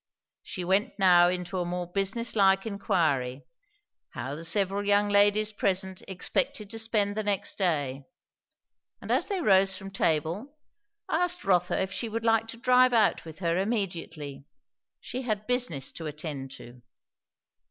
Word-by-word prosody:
She 180 Hz, -, -6 dB
went 195 Hz, +2 st, +1 dB
now 175 Hz, -3 st, +6 dB
into 180 Hz, +1 st, -3 dB
a -, -, 0 dB
more 175 Hz, 0 st, -3 dB
business 195 Hz, +7 st, -2 dB
like 195 Hz, -1 st, +4 dB
inquiry, 160 Hz, -, -1 dB, 0.6 s
how 130 Hz, +2 st, -6 dB
the 155 Hz, +3 st, -7 dB
several 200 Hz, +3 st, +1 dB
young 205 Hz, 0 st, +3 dB
ladies 205 Hz, +1 st, +3 dB
present 190 Hz, -2 st, -1 dB
expected 195 Hz, +2 st, -2 dB
to 225 Hz, -, -6 dB
spend 210 Hz, -2 st, 0 dB
the 215 Hz, -, -1 dB
next 205 Hz, -2 st, 0 dB
day; 145 Hz, -7 st, 0 dB, 0.9 s
and -, -, -6 dB
as -, -, +1 dB
they 390 Hz, -4 st, -2 dB
rose 195 Hz, -, +4 dB
from 195 Hz, 0 st, -9 dB
table, 185 Hz, -, -1 dB, 0.5 s
asked 355 Hz, +2 st, 0 dB
Rotha 180 Hz, -2 st, +2 dB
if 190 Hz, 0 st, -1 dB
she 230 Hz, -, -3 dB
would 225 Hz, +1 st, -4 dB
like 225 Hz, 0 st, +3 dB
to 230 Hz, -, -7 dB
drive 250 Hz, +1 st, +4 dB
out 220 Hz, -6 st, +2 dB
with 160 Hz, -1 st, -10 dB
her 170 Hz, +2 st, +1 dB
immediately. 170 Hz, -9 st, -3 dB, 0.6 s
She 255 Hz, -, -5 dB
had 215 Hz, -4 st, -3 dB
business 245 Hz, -, -1 dB
to 160 Hz, -, -7 dB
attend 150 Hz, -3 st, -6 dB
to. 120 Hz, -2 st, -13 dB
195 Hz, 150 wpm, -28 LUFS, 170-215 Hz, 0.9 s, now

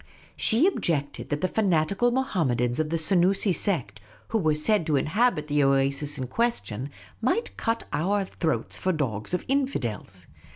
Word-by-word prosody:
She 235 Hz, +8 st, +3 dB
objected 160 Hz, -, -1 dB
that 145 Hz, 0 st, -2 dB
the 185 Hz, -, +2 dB
fanatical 195 Hz, +2 st, +1 dB
Mohammedans 155 Hz, -, 0 dB
of 155 Hz, -1 st, 0 dB
the 165 Hz, -, 0 dB
Senoosi 185 Hz, +4 st, +2 dB
sect, 170 Hz, -, -1 dB, 0.3 s
who 225 Hz, -, +1 dB
were 155 Hz, -5 st, +2 dB
said 170 Hz, +5 st, +2 dB
to 155 Hz, -, +2 dB
inhabit 175 Hz, -, +1 dB
the 145 Hz, -1 st, +1 dB
oasis 140 Hz, +2 st, +1 dB
in 130 Hz, -, -3 dB
question, 135 Hz, -, -2 dB, 0.3 s
might 355 Hz, -, 0 dB
cut 230 Hz, 0 st, -1 dB
our 195 Hz, +5 st, +1 dB
throats 165 Hz, -3 st, -2 dB
for 185 Hz, -, 0 dB
dogs 125 Hz, -, -2 dB
of -, -, -4 dB
infidels. 120 Hz, -, -2 dB
160 Hz, 155 wpm, -26 LUFS, 140-210 Hz, 0.3 s, She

